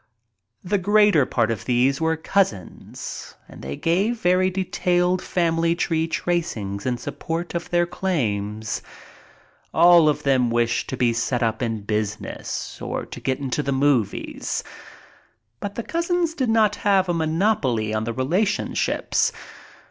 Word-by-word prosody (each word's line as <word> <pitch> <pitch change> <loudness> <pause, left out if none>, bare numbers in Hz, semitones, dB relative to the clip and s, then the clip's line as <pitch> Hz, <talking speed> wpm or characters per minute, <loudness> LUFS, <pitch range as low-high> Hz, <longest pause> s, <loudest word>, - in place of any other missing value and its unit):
The 200 +2 0
greater 205 -6 +4
part 115 -2 +1
of 110 - -4
these 130 +4 +2
were 160 0 +1
cousins 160 - -3
and - - -13
they 70 +1 -5
gave 195 - 0
very 185 0 +3
detailed 180 -1 0
family 165 -1 +1
tree 165 -2 0
tracings 130 - -2
in 125 -1 0
support 165 +7 -4
of 170 -1 -4
their 175 0 +2
claims. 110 - -2 0.9
All 170 -1 +7
of 150 - -1
them 130 -3 +3
wished 115 0 0
to 130 - -4
be 120 -1 +2
set 120 +1 -1
up 110 0 -1
in 115 -3 -2
business 105 0 -4
or - - -3
to - - -9
get 130 -1 -1
into 140 +1 -2
the 140 - -2
movies. 135 -5 0 1.0
But 200 +5 -5
the 235 - -3
cousins 340 +1 0
did 260 -7 -1
not 220 -2 +3
have 195 -2 +2
a 175 - +1
monopoly 160 - +1
on 110 0 0
the 115 - -3
relation 180 - 0
ships. - - +1
160 Hz, 145 wpm, -23 LUFS, 120-185 Hz, 1.0 s, All